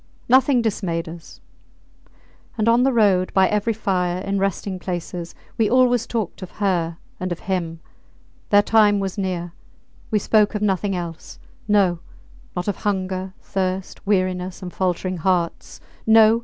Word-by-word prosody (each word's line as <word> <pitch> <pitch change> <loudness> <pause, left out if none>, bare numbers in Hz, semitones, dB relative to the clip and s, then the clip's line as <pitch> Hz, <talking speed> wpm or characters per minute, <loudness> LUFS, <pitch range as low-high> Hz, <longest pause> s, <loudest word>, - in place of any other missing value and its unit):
Nothing 260 0 +4
dismayed 175 -7 -2
us. 165 0 -11 1.2
And 215 0 +1
on 235 +1 +5
the 270 +1 +3
road, 200 -6 +3
by 190 -1 +5
every 210 +2 0
fire, 180 -4 0
in 195 0 -1
resting 195 0 -2
places, 175 -1 -5 0.2
we 220 - +3
always 245 -2 +3
talked 220 -6 -3
of 185 - -7
her 175 -5 0 0.2
and 185 0 -3
of 175 - -4
him. 170 -4 -3 0.7
Their 205 0 +6
time 210 -2 +4
was 195 0 -3
near. 175 -3 -3 0.6
We 215 - +2
spoke 210 +1 +3
of 210 - -1
nothing 195 -1 0
else. 170 -2 -6 0.3
No! 195 -5 +3 0.6
not 180 +1 -3
of 205 - -1
hunger, 190 -1 -2
thirst, 190 +1 -3
weariness, 185 -2 0
and 180 - -6
faltering 185 0 -1
hearts. 175 0 -1 0.3
No! 220 0 +6
190 Hz, 145 wpm, -22 LUFS, 180-210 Hz, 1.2 s, Their